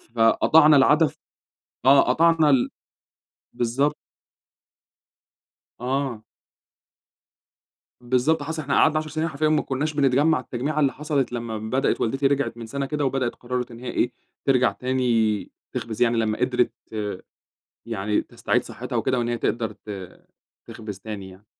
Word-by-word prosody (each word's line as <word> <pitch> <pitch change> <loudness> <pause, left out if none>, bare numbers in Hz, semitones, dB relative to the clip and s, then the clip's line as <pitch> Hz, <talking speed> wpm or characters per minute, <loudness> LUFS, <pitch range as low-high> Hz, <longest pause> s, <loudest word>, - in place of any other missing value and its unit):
فقطعنا 150 +7 +5
العادة 150 +4 +5
ف - - -11 0.7
آه 135 +1 +7
قطعنا 165 -2 +4
ال 130 -3 +3 0.8
بالضبط. 135 +5 0 1.8
آه. 130 -2 -2 1.8
بالضبط 130 +5 +1
حصل، 160 +2 -4
إحنا 140 -1 -2
قعدنا 155 0 +4
10 155 - -6
سنين 155 +1 -1
حرفيًا 155 0 0
ما 155 - +3
كناش 145 +4 -2
بنتجمّع 140 +2 +3
التجميعة 130 +5 -3
اللي 140 -3 +2
حصلت 145 -3 -1
لمّا 115 -2 -4
بدأت 110 +5 -1
والدتي 135 +4 +1
رجعت 140 -4 -1
من 115 - -7
سنة 140 +4 -3
كده 150 0 -2
وبدأت 130 -2 0
وقرّرت 125 0 -4
إن 115 - -10
هي 125 0 -6
إيه، 125 - 0 0.3
ترجع 130 -2 +3
تاني 120 -5 0 0.2
تخبز 110 -2 -5
يعني 120 -1 +3
لمّا 110 -1 0
قدرت 125 -1 +1 1.2
يعني 105 +2 -1
تستعيد - - -1
صحتها - - -6
وكده 130 - +1
وإن 120 0 -1
هي 120 -1 -1
تقدر 115 -2 -1
ت 100 -3 -10 0.5
تخبز 105 -4 -8
تاني 100 -2 -7
يعني. 95 +3 -17
130 Hz, 140 wpm, -24 LUFS, 115-145 Hz, 1.8 s, آه